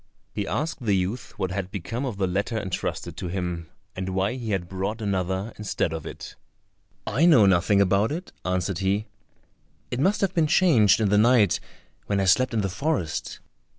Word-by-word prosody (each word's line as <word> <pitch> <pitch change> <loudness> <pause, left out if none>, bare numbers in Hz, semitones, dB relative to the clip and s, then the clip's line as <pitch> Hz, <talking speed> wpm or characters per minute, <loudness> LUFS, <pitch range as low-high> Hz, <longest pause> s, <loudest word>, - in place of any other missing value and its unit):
He 100 -2 -3
asked 155 -1 -2
the 105 -4 +2
youth 100 +6 -3
what 95 -2 -2
had 95 -1 -3
become 115 +8 -4
of 115 -6 -5
the 95 - +1
letter 100 +5 -1
entrusted 95 -4 -3
to 95 - -4
him, 90 -2 -4 0.3
and 95 0 -3
why 95 +3 0
he 120 -3 -5
had 95 -4 -1
brought 95 +5 -3
another 95 0 -2
instead 100 -5 -1
of 80 -2 -5
it. - - -9 0.7
"I 145 +11 +3
know 125 -12 +7
nothing 95 +2 +3
about 100 +3 +3
it," 175 +4 -5
answered 90 -1 -1
he; 100 +2 0 0.9
"it 125 - -2
must 195 +9 +2
have 195 -2 +1
been 165 -4 +2
changed 120 - +5
in 105 - +2
the 105 +1 +4
night, 115 -3 +4 0.5
when 100 -1 +1
I 95 - +1
slept 130 +8 +4
in 110 - +2
the 100 - 0
forest." 95 - -2
100 Hz, 185 wpm, -25 LUFS, 95-115 Hz, 0.9 s, know